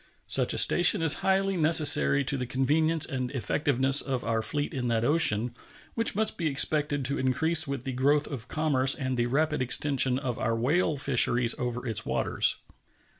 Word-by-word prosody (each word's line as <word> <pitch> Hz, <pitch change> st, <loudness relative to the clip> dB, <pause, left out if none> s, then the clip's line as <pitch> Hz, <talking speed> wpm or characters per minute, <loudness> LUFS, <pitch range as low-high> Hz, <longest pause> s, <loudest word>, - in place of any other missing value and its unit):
Such -, -, +1 dB
a -, -, -1 dB
station 175 Hz, +1 st, +4 dB
is 160 Hz, -2 st, +5 dB
highly 195 Hz, 0 st, -1 dB
necessary 155 Hz, -3 st, +3 dB
to 140 Hz, -, -1 dB
the 125 Hz, -2 st, -5 dB
convenience 155 Hz, +5 st, +1 dB
and 130 Hz, -3 st, -5 dB
effectiveness 135 Hz, +2 st, +1 dB
of 130 Hz, -3 st, -5 dB
our 115 Hz, -1 st, -3 dB
fleet 145 Hz, +6 st, -3 dB
in 125 Hz, -2 st, -5 dB
that 115 Hz, -1 st, -2 dB
ocean, 125 Hz, -7 st, +1 dB, 0.4 s
which 230 Hz, -3 st, 0 dB
must 215 Hz, -2 st, +1 dB
be 165 Hz, -, -2 dB
expected 145 Hz, -1 st, -1 dB
to 140 Hz, +3 st, -3 dB
increase 160 Hz, +5 st, +2 dB
with 140 Hz, -3 st, -6 dB
the 135 Hz, -, -6 dB
growth 145 Hz, +4 st, 0 dB
of 125 Hz, -5 st, -8 dB
commerce 135 Hz, -3 st, +1 dB
and 130 Hz, -1 st, -5 dB
the 120 Hz, -1 st, -2 dB
rapid 150 Hz, +3 st, -2 dB
extension 130 Hz, 0 st, +2 dB
of 125 Hz, -3 st, -6 dB
our 115 Hz, +1 st, -2 dB
whale 150 Hz, +6 st, -1 dB
fisheries 125 Hz, -3 st, +2 dB
over 125 Hz, 0 st, -5 dB
its 110 Hz, -3 st, -3 dB
waters. -, -, -1 dB
140 Hz, 175 wpm, -25 LUFS, 125-155 Hz, 0.4 s, is